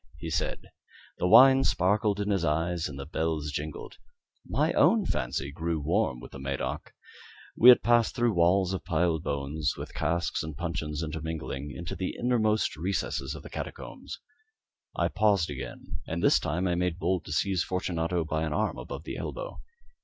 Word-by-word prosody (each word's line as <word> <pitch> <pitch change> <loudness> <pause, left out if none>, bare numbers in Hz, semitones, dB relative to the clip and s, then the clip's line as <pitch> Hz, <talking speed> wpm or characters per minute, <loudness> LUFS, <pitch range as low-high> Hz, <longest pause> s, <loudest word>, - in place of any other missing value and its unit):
he 80 +2 -6
said. 80 - -2 0.5
The 90 - +1
wine 135 +6 +8
sparkled 100 +2 +2
in 105 0 -1
his 95 -4 +1
eyes 85 +2 0
and 70 - -8
the 70 - -6
bells 80 -1 -2
jingled. 75 +3 -6 0.5
My - - +1
own 220 -4 +4
fancy 65 0 -2
grew 80 +1 -2
warm 80 - 0
with - - -11
the 70 - -9
Medoc. 70 0 -4 0.6
We 120 - +8
had 125 - +8
passed 120 +1 +3
through 120 -3 +2
walls 90 +2 +3
of 95 - -4
piled 80 -1 +1
bones, 75 +3 -2
with - - -7
casks 85 +3 -1
and 80 -3 -6
puncheons 80 -3 -3
intermingling, 80 -3 -4
into 75 +5 -6
the 95 - -3
inmost 110 -7 +1
recesses 85 -6 -2
of - - -10
catacombs. - - -7 0.8
I - - +1
paused 100 -7 +2
again, 70 - -7
and 85 +2 -3
this - - +5
time 90 +5 -1
I 90 - +1
made 90 -1 0
bold 90 -1 0
to - - -8
seize 90 +3 +1
Fortunato 85 -2 -1
by 80 +1 -2
an 80 -2 -1
arm 105 +6 -1
above - - -7
the - - -6
elbow. - - -6
85 Hz, 170 wpm, -28 LUFS, 75-95 Hz, 0.8 s, wine